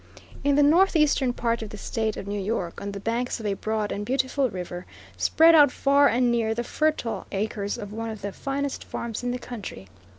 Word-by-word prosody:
In 285 Hz, 0 st, +3 dB
the 290 Hz, -, +5 dB
northeastern 305 Hz, -5 st, +4 dB
part 235 Hz, -1 st, -1 dB
of 220 Hz, -, -5 dB
the 210 Hz, -, -8 dB
State 220 Hz, +1 st, -2 dB
of -, -, -6 dB
New 205 Hz, +1 st, -3 dB
York 190 Hz, -4 st, -3 dB
on 200 Hz, -, -4 dB
the 200 Hz, -, -6 dB
banks 235 Hz, +4 st, -2 dB
of 220 Hz, -, -7 dB
a 205 Hz, -, +1 dB
broad 215 Hz, +1 st, -2 dB
and 205 Hz, -, -3 dB
beautiful 260 Hz, +2 st, 0 dB
river, 180 Hz, -2 st, -6 dB, 0.3 s
spread 330 Hz, +1 st, +5 dB
out 295 Hz, -4 st, +7 dB
far 280 Hz, +2 st, +4 dB
and 245 Hz, 0 st, +2 dB
near 225 Hz, -2 st, +1 dB
the 240 Hz, -, -2 dB
fertile 305 Hz, -4 st, -1 dB
acres 205 Hz, +1 st, -2 dB
of 210 Hz, -3 st, -7 dB
one 225 Hz, +1 st, -4 dB
of 215 Hz, -3 st, -8 dB
the 200 Hz, -, -3 dB
finest 275 Hz, +4 st, -3 dB
farms 230 Hz, -2 st, -5 dB
in 245 Hz, -, -2 dB
the 245 Hz, -, -1 dB
country. 210 Hz, -, -8 dB
230 Hz, 210 wpm, -25 LUFS, 205-275 Hz, 0.3 s, out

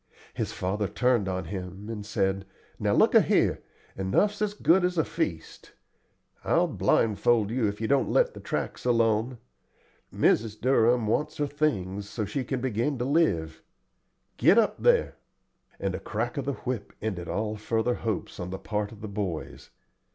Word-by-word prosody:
His -, -, -3 dB
father 100 Hz, +3 st, -2 dB
turned 120 Hz, -5 st, +1 dB
on 95 Hz, -1 st, -3 dB
him 95 Hz, +3 st, -7 dB
and 110 Hz, -2 st, -5 dB
said: 95 Hz, -2 st, -1 dB, 0.3 s
"Now -, -, +1 dB
look -, -, +4 dB
a' -, -, +8 dB
here, -, -, +2 dB, 0.3 s
enough's 200 Hz, -, +1 dB
as 210 Hz, -1 st, 0 dB
good 185 Hz, -2 st, +4 dB
as 180 Hz, 0 st, 0 dB
a 160 Hz, -, +3 dB
feast. 90 Hz, -, -4 dB, 0.7 s
I'll -, -, +3 dB
blindfold 110 Hz, 0 st, +2 dB
you 120 Hz, -2 st, +1 dB
if 100 Hz, 0 st, -4 dB
you 110 Hz, -, -1 dB
don't 140 Hz, +1 st, +2 dB
let -, -, +3 dB
the -, -, -9 dB
tracks -, -, -4 dB
alone. 115 Hz, 0 st, +2 dB, 0.7 s
Mrs. 110 Hz, -1 st, +1 dB
Durham 120 Hz, -2 st, +3 dB
wants 150 Hz, +8 st, -1 dB
her 145 Hz, -, +1 dB
things, 105 Hz, -10 st, -2 dB
so 110 Hz, -1 st, -3 dB
she 135 Hz, +5 st, -3 dB
can 130 Hz, 0 st, -3 dB
begin 130 Hz, +3 st, -1 dB
to 120 Hz, -, -2 dB
live. 85 Hz, -, +1 dB, 0.8 s
Get 200 Hz, -, +5 dB
up 225 Hz, -2 st, +2 dB
there;" 485 Hz, -1 st, +3 dB, 0.6 s
and -, -, -1 dB
a -, -, -3 dB
crack -, -, -3 dB
of 140 Hz, -3 st, -3 dB
the 140 Hz, -, -1 dB
whip 125 Hz, -5 st, -5 dB
ended 95 Hz, -6 st, -4 dB
all 105 Hz, 0 st, -2 dB
further 110 Hz, +3 st, 0 dB
hopes 110 Hz, -4 st, -4 dB
on 90 Hz, 0 st, -4 dB
the 95 Hz, -, -4 dB
part 105 Hz, 0 st, -3 dB
of 110 Hz, -, -13 dB
the 110 Hz, -, -5 dB
boys. 100 Hz, -6 st, -5 dB
110 Hz, 170 wpm, -27 LUFS, 100-135 Hz, 0.8 s, a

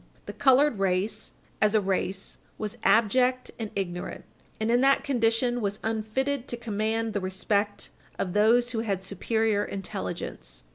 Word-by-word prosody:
The -, -, -6 dB
colored 265 Hz, -3 st, +4 dB
race, 190 Hz, +2 st, -1 dB, 0.3 s
as 215 Hz, 0 st, +4 dB
a -, -, +6 dB
race, 195 Hz, 0 st, -2 dB, 0.2 s
was 210 Hz, -2 st, -4 dB
abject 250 Hz, +3 st, +3 dB
and 220 Hz, -2 st, -3 dB
ignorant, 180 Hz, -2 st, -4 dB, 0.3 s
and 220 Hz, +1 st, +1 dB
in 240 Hz, +1 st, +4 dB
that 275 Hz, +1 st, +4 dB
condition 240 Hz, -2 st, +1 dB
was 205 Hz, 0 st, -2 dB
unfitted 235 Hz, +5 st, -1 dB
to 240 Hz, -, -4 dB
command 220 Hz, 0 st, -1 dB
the 205 Hz, -, 0 dB
respect 200 Hz, +2 st, -1 dB, 0.3 s
of 180 Hz, -, -2 dB
those 235 Hz, +4 st, +4 dB
who 230 Hz, -, -1 dB
had 200 Hz, -4 st, -2 dB
superior 210 Hz, +2 st, 0 dB
intelligence. 185 Hz, -, -5 dB
220 Hz, 145 wpm, -27 LUFS, 200-240 Hz, 0.3 s, a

